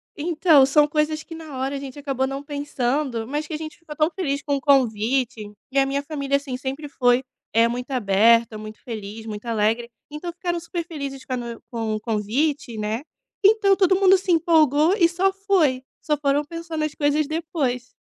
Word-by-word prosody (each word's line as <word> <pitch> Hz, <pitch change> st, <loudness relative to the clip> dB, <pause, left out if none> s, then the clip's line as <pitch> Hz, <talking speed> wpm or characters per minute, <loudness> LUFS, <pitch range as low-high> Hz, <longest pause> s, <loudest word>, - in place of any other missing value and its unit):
Então, 320 Hz, -2 st, +4 dB
são 295 Hz, +2 st, +4 dB
coisas 305 Hz, +1 st, 0 dB
que -, -, -11 dB
na 315 Hz, -4 st, -8 dB
hora 270 Hz, +2 st, -2 dB
a -, -, -3 dB
gente 275 Hz, 0 st, -8 dB
acabou 270 Hz, -2 st, -1 dB
não 275 Hz, +1 st, -5 dB
pensando, 280 Hz, -4 st, -2 dB
mas 295 Hz, +3 st, -3 dB
que 320 Hz, -, -7 dB
a -, -, -1 dB
gente 310 Hz, 0 st, -8 dB
ficou 315 Hz, -3 st, -10 dB
tão 310 Hz, +3 st, +2 dB
feliz 285 Hz, -6 st, -2 dB
com 285 Hz, -, 0 dB
o 275 Hz, -, -3 dB
convite, 245 Hz, -4 st, +1 dB, 0.2 s
e 275 Hz, -, +2 dB
a 270 Hz, -, +3 dB
minha 280 Hz, +1 st, -1 dB
família, 280 Hz, -2 st, -1 dB
assim, 280 Hz, -2 st, -5 dB
sempre 270 Hz, +3 st, -5 dB
foi, 250 Hz, -2 st, +2 dB, 0.3 s
eh, 230 Hz, +1 st, +4 dB
muito 245 Hz, +2 st, -4 dB
aberta, 230 Hz, -1 st, +3 dB
muito 215 Hz, 0 st, -8 dB
feliz, 220 Hz, -1 st, -7 dB
muito 210 Hz, 0 st, -7 dB
alegre, 225 Hz, +1 st, 0 dB, 0.2 s
então 325 Hz, +4 st, -5 dB
ficaram 345 Hz, 0 st, -3 dB
super 340 Hz, 0 st, -5 dB
felizes 280 Hz, -5 st, -6 dB
com 255 Hz, -, -4 dB
a -, -, 0 dB
no 235 Hz, -1 st, -6 dB
com 225 Hz, -2 st, -2 dB
o 215 Hz, -, -3 dB
convite, 235 Hz, +4 st, -1 dB
né, 215 Hz, +3 st, -2 dB, 0.4 s
então 400 Hz, -1 st, +5 dB
todo 375 Hz, -1 st, +4 dB
mundo 385 Hz, -1 st, +6 dB
se 375 Hz, -, -2 dB
empolgou 320 Hz, -1 st, +4 dB
e 335 Hz, -, +5 dB
só 380 Hz, +3 st, +1 dB
foi, 360 Hz, -10 st, +1 dB, 0.2 s
só 300 Hz, -, 0 dB
foram 290 Hz, 0 st, +1 dB
pensar 335 Hz, +1 st, -7 dB
nas 305 Hz, -1 st, -1 dB
coisas 295 Hz, 0 st, +1 dB
depois. 310 Hz, -6 st, -2 dB
280 Hz, 200 wpm, -23 LUFS, 245-315 Hz, 0.4 s, mundo